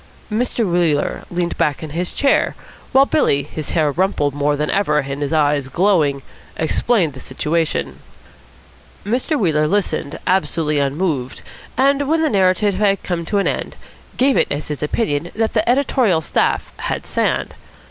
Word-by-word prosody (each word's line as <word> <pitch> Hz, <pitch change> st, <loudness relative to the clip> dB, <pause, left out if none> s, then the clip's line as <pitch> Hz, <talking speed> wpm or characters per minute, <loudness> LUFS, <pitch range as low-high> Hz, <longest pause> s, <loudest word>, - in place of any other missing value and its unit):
Mr. 230 Hz, +1 st, 0 dB
Wheeler 170 Hz, -5 st, 0 dB
leaned 175 Hz, 0 st, -2 dB
back 150 Hz, +1 st, 0 dB
in 155 Hz, -, -6 dB
his 175 Hz, +3 st, -2 dB
chair, 280 Hz, -, +2 dB, 0.4 s
while 270 Hz, +1 st, +6 dB
Billy, 145 Hz, -, +2 dB
his 150 Hz, +1 st, -6 dB
hair 155 Hz, -2 st, +3 dB
rumpled 155 Hz, -4 st, 0 dB
more 145 Hz, +1 st, +1 dB
than 150 Hz, +1 st, -1 dB
ever 185 Hz, -7 st, +1 dB
and 140 Hz, 0 st, -2 dB
his 145 Hz, -, -2 dB
eyes 145 Hz, -3 st, +2 dB
glowing, 150 Hz, -4 st, +1 dB, 0.3 s
explained 165 Hz, -, +1 dB
the 130 Hz, -, -10 dB
situation. 155 Hz, +5 st, -2 dB, 1.1 s
Mr. 250 Hz, +8 st, 0 dB
Wheeler 155 Hz, -6 st, +2 dB
listened 185 Hz, -6 st, -1 dB
absolutely 165 Hz, -5 st, +1 dB
unmoved, 140 Hz, -2 st, -2 dB, 0.3 s
and, 275 Hz, +1 st, +2 dB
when 320 Hz, +1 st, +2 dB
the 310 Hz, -, +1 dB
narrative 195 Hz, +1 st, +2 dB
had 195 Hz, 0 st, +1 dB
come 170 Hz, -2 st, -3 dB
to 205 Hz, -, -1 dB
an 200 Hz, -, +1 dB
end, -, -, -3 dB, 0.4 s
gave 265 Hz, +1 st, +3 dB
it -, -, +3 dB
as 145 Hz, +2 st, -4 dB
his 150 Hz, -, -4 dB
opinion 150 Hz, -1 st, -1 dB
that 220 Hz, 0 st, 0 dB
the 220 Hz, 0 st, +1 dB
editorial 245 Hz, -, +2 dB
staff -, -, 0 dB
had -, -, -3 dB
sand. -, -, -1 dB
170 Hz, 155 wpm, -19 LUFS, 150-210 Hz, 1.1 s, while